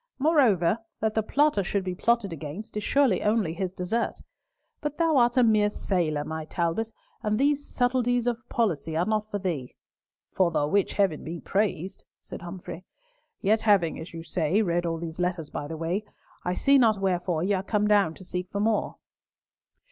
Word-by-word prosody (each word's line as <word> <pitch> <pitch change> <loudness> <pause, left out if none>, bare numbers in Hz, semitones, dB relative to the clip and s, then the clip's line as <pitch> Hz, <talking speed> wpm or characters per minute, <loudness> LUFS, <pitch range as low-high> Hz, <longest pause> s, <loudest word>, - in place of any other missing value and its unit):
"Moreover, 240 - +3 0.2
that 220 0 0
the 220 - +2
plotter 285 0 +2
should 195 +2 -1
be 185 -1 -3
plotted 215 -1 +1
against 160 +8 -7
is 210 - -2
surely 265 -9 +3
only 210 -6 +1
his 180 +1 -3
desert. 190 +6 -2 0.6
But 295 -1 -3
thou 330 -3 +3
art 240 0 +3
a 250 - +6
mere 215 -2 +4
sailor, 165 -8 -1
my 160 +1 -5
Talbot, 170 +8 -1 0.3
and 215 -2 0
these 285 +2 +2
subtilties 245 -1 +1
of 245 +1 -2
policy 165 -8 0
are 175 - +2
not 215 0 -1
for 205 - -2
thee." 170 -10 -4 0.6
"For 185 -2 +2
the 155 -3 +1
which 195 +6 +1
Heaven 190 -7 +1
be 165 +2 -5
praised!" 195 -2 -1 0.2
said - - -9
Humfrey. 175 0 -8 0.6
"Yet 215 +2 +3
having, 195 -7 +3
as 160 +2 -8
you 165 -1 -7
say, 175 +5 +1
read 175 -2 0
all 165 0 -1
these 165 0 -7
letters 175 -4 -2
by 145 - -4
the 160 +1 -6
way, 170 +6 -1 0.4
I 180 0 -1
see 275 +6 +4
not 225 -4 +4
wherefore 180 -3 0
ye 200 +2 +1
are 190 - +1
come 210 +1 0
down 200 -6 +3
to 185 - -13
seek 180 +1 -4
for 200 - -3
more." 215 0 0
195 Hz, 185 wpm, -27 LUFS, 170-225 Hz, 0.6 s, a